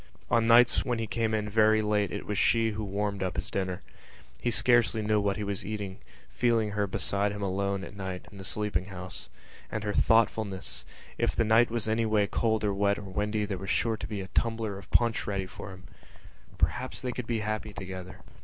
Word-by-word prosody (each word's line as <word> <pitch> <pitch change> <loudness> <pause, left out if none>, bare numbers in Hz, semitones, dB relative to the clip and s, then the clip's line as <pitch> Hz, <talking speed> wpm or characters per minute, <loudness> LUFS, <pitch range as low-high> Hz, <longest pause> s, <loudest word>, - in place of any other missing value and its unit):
On 115 -1 +4
nights 120 +1 +6
when 120 -2 -1
he 115 - -1
came 110 0 -1
in 105 -1 -1
very 110 0 +4
late 105 -2 +1
it - - -5
was 105 - -2
she 115 -1 +3
who 110 0 -4
warmed 100 0 -2
up 95 -2 -1
his 100 +7 -4
dinner. 95 -2 -2 0.6
He - - 0
scarcely 120 -2 +3
knew 105 0 +2
what 100 -1 0
he 105 - -3
was 100 -1 -2
eating, 100 -1 -5 0.3
feeling 115 -3 +2
her 105 0 0
beside 100 +2 0
him 105 0 -5
alone, 100 0 -1
at 100 - -9
night, 95 -2 -5
in 100 - -11
the - - -7
sleeping 95 -1 -1
house. 95 -2 -7 0.4
And 110 - -3
her 105 -1 -1
thoughtfulness! 110 -4 +1 0.3
If - - +1
the 115 - +2
night 115 +2 +5
was 115 -2 -2
anyway 110 -2 +2
cold 110 +1 0
or 105 -1 +1
wet 100 +1 +2
or - - -7
windy 105 +2 -1
there 100 -3 -4
was 95 0 -6
sure 115 -1 +2
to - - -6
be 105 -3 -4
a - - -4
little 95 - +2
tumbler 110 -4 -3
of 100 - -14
punch 120 0 +2
ready 100 -2 -1
for 90 - -9
him. 95 -1 -11 0.7
Perhaps 130 - -1
they 125 - -1
could 125 -1 -5
be 115 -2 0
happy 110 0 -3
together.... 95 -2 -7
105 Hz, 215 wpm, -29 LUFS, 100-110 Hz, 0.7 s, nights